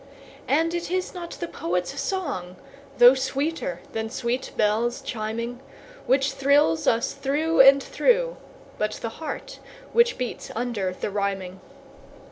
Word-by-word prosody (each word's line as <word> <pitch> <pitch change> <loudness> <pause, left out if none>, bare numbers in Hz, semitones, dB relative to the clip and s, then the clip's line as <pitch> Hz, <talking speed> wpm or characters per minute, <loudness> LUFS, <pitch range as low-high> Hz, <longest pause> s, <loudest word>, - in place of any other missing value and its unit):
And 325 +4 +2
it 345 -1 -3
is 370 +1 -2
not 345 -2 -6
the 345 - -5
poet's 180 - -3
song, 275 - -3 0.4
though 245 +1 +9
sweeter 270 - -2
than 220 0 -3
sweet 245 +1 -2
bells 220 +3 +1
chiming, 230 +2 -4 0.5
Which 270 +2 +3
thrills 275 - +2
us 230 +1 +2
through 290 +4 0
and 275 +1 +8
through, - - +1 0.4
but 215 0 0
the 230 - -5
heart 310 - -6 0.3
which 475 +1 +4
beats 250 -2 -4
under 225 -6 -2
the 185 - -4
rhyming. 195 -2 -2
250 Hz, 130 wpm, -25 LUFS, 215-310 Hz, 0.5 s, though